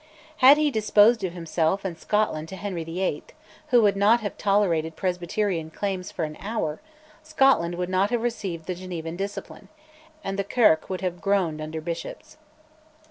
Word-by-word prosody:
Had 270 Hz, +3 st, +8 dB
he 300 Hz, -1 st, +2 dB
disposed 215 Hz, 0 st, +4 dB
of 180 Hz, -2 st, -2 dB
himself 170 Hz, +2 st, -1 dB
and 180 Hz, -3 st, -3 dB
Scotland 165 Hz, -5 st, -1 dB
to 190 Hz, -, -7 dB
Henry 190 Hz, -4 st, -4 dB
VIII. 165 Hz, -1 st, -2 dB, 0.5 s
(who 245 Hz, -3 st, +4 dB
would 205 Hz, -1 st, +3 dB
not 210 Hz, +4 st, +4 dB
have 205 Hz, -, -4 dB
tolerated 175 Hz, -6 st, +1 dB
Presbyterian 180 Hz, -1 st, -2 dB
claims 190 Hz, +1 st, -4 dB
for 165 Hz, -, -2 dB
an 155 Hz, 0 st, -8 dB
hour), 200 Hz, -8 st, -3 dB, 0.4 s
Scotland 270 Hz, -, +2 dB
would 180 Hz, 0 st, -2 dB
not 185 Hz, +2 st, +1 dB
have 240 Hz, -1 st, -1 dB
received 200 Hz, -9 st, -3 dB
the 185 Hz, -, -3 dB
Genevan 175 Hz, -2 st, -6 dB
discipline, 200 Hz, +2 st, -6 dB, 0.5 s
and 195 Hz, 0 st, -3 dB
the -, -, +1 dB
Kirk 200 Hz, -6 st, +3 dB
would 185 Hz, -1 st, -3 dB
have 180 Hz, -2 st, -3 dB
groaned 185 Hz, -6 st, 0 dB
under 155 Hz, +1 st, -5 dB
bishops. 170 Hz, -, -7 dB
190 Hz, 165 wpm, -25 LUFS, 165-210 Hz, 0.5 s, Had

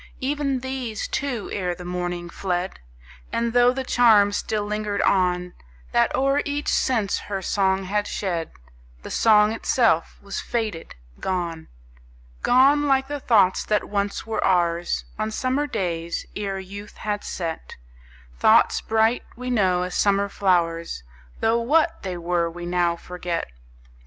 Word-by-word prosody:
Even 275 Hz, -1 st, -1 dB
these, 255 Hz, -5 st, -4 dB
too, 260 Hz, -6 st, -3 dB
ere 180 Hz, -3 st, -2 dB
the 180 Hz, 0 st, -10 dB
morning, 175 Hz, -1 st, -3 dB
fled; 180 Hz, +1 st, -3 dB, 0.5 s
And, 235 Hz, 0 st, -1 dB
tho' 245 Hz, 0 st, +5 dB
the 265 Hz, +1 st, -3 dB
charm 220 Hz, -5 st, +5 dB
still 210 Hz, 0 st, -2 dB
lingered 210 Hz, -1 st, -2 dB
on, 180 Hz, -2 st, +1 dB, 0.4 s
That 120 Hz, -, +3 dB
o'er 275 Hz, +2 st, +2 dB
each 290 Hz, 0 st, -2 dB
sense 220 Hz, -7 st, +1 dB
her 195 Hz, -2 st, -5 dB
song 190 Hz, 0 st, +1 dB
had 205 Hz, +2 st, -1 dB
shed, 175 Hz, -5 st, -2 dB, 0.5 s
The -, -, -8 dB
song 210 Hz, -1 st, +5 dB
itself 225 Hz, -7 st, +1 dB
was 200 Hz, -1 st, -5 dB
faded, 215 Hz, -8 st, -3 dB, 0.2 s
gone; 170 Hz, -4 st, -3 dB, 0.7 s
Gone, 280 Hz, +4 st, +4 dB
like 270 Hz, 0 st, +2 dB
the 290 Hz, 0 st, -3 dB
thoughts 205 Hz, -8 st, +3 dB
that 210 Hz, -1 st, 0 dB
once 200 Hz, 0 st, -2 dB
were 225 Hz, 0 st, -2 dB
ours, 175 Hz, -2 st, +1 dB
On 215 Hz, 0 st, 0 dB
summer 260 Hz, +6 st, -1 dB
days, 170 Hz, -, -3 dB
ere 200 Hz, -2 st, -3 dB
youth 200 Hz, +2 st, -9 dB
had 210 Hz, -1 st, -3 dB
set; 165 Hz, -3 st, -5 dB, 0.6 s
Thoughts -, -, +5 dB
bright, 225 Hz, +2 st, +2 dB
we 250 Hz, +1 st, -4 dB
know, 185 Hz, -6 st, +2 dB
as 180 Hz, 0 st, -4 dB
summer 200 Hz, 0 st, +2 dB
flowers, 170 Hz, -, 0 dB, 0.4 s
Tho' 225 Hz, +1 st, +3 dB
what 320 Hz, +7 st, +2 dB
they 185 Hz, -2 st, -4 dB
were 170 Hz, 0 st, 0 dB
we 175 Hz, +1 st, -8 dB
now 175 Hz, -1 st, +1 dB
forget. 175 Hz, 0 st, -4 dB
200 Hz, 140 wpm, -23 LUFS, 180-235 Hz, 0.7 s, tho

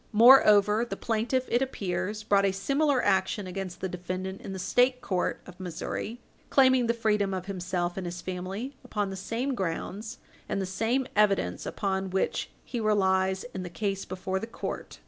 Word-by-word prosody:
Moreover, 215 Hz, -2 st, +7 dB
the 240 Hz, -, -5 dB
plaintiff, 235 Hz, +3 st, 0 dB
it 240 Hz, -, +1 dB
appears, 205 Hz, -4 st, -2 dB
brought 200 Hz, -2 st, +3 dB
a 195 Hz, -, +3 dB
similar 275 Hz, +7 st, +1 dB
action 200 Hz, +1 st, +1 dB
against 185 Hz, 0 st, -6 dB
the 190 Hz, -, -1 dB
defendant 185 Hz, +1 st, -5 dB
in 195 Hz, -, -7 dB
the 190 Hz, -, -4 dB
State 250 Hz, +7 st, +2 dB
court 185 Hz, -7 st, -1 dB
of 180 Hz, 0 st, -13 dB
Missouri, 185 Hz, +6 st, -4 dB, 0.3 s
claiming 260 Hz, -3 st, +5 dB
the 235 Hz, -, +2 dB
freedom 210 Hz, -4 st, +1 dB
of 185 Hz, -1 st, -4 dB
himself 180 Hz, -2 st, -2 dB
and 185 Hz, -2 st, -3 dB
his 175 Hz, +1 st, -5 dB
family 190 Hz, +9 st, -5 dB
upon 205 Hz, -2 st, -2 dB
the -, -, -4 dB
same 230 Hz, +8 st, -2 dB
grounds 195 Hz, +2 st, -4 dB, 0.3 s
and -, -, -1 dB
the 190 Hz, -, -1 dB
same 225 Hz, +8 st, 0 dB
evidence 200 Hz, -, +2 dB
upon 190 Hz, -1 st, -1 dB
which 190 Hz, +1 st, -1 dB, 0.2 s
he 240 Hz, -, -4 dB
relies 190 Hz, -3 st, +2 dB
in 190 Hz, -, -4 dB
the 180 Hz, -, -5 dB
case 195 Hz, +2 st, -2 dB
before 190 Hz, +1 st, -3 dB
the 225 Hz, -, -5 dB
court. 230 Hz, -, -6 dB
195 Hz, 175 wpm, -28 LUFS, 185-230 Hz, 0.3 s, Moreover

